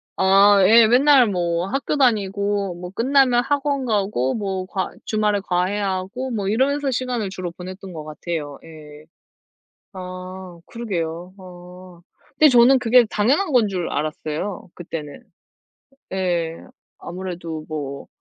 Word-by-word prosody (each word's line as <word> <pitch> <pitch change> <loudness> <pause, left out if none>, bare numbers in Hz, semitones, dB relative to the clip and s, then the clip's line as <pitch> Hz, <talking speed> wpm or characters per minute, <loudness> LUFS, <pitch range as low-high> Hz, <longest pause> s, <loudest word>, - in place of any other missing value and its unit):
아, 195 +1 +5
예. 225 +2 +7
맨날 260 +1 +5
뭐 175 -2 -1
학교 270 +5 -2
다니고 200 -6 0
뭐 180 +1 -8
끝나면 250 +2 +3
학원 280 0 -1
가고 200 - 0
뭐 195 -3 -3
과 190 -1 -3
주말에 210 -1 0
과외하고 195 +6 -2
뭐 205 -4 -2
이러면서 275 +6 +1
시간을 245 -4 -2
주로 185 -2 -6
보냈던 185 +2 -9
것 155 -2 -7
같아요. 150 -1 -5
예. 155 -2 -13 0.9
아 185 -1 -9
그러게요. 180 -6 -5
어 180 -1 -13 0.4
근데 310 - +7
저는 250 +1 +6
그게 245 0 +5
당연한 280 - +1
건 235 -5 +4
줄 185 -3 -3
알았어요, 155 +6 -4
그때는. 155 -4 -8 0.9
예 175 -3 -1 0.4
아무래도 170 -3 -6
뭐 140 -3 -6
190 Hz, 245 characters per minute, -21 LUFS, 175-230 Hz, 0.9 s, 예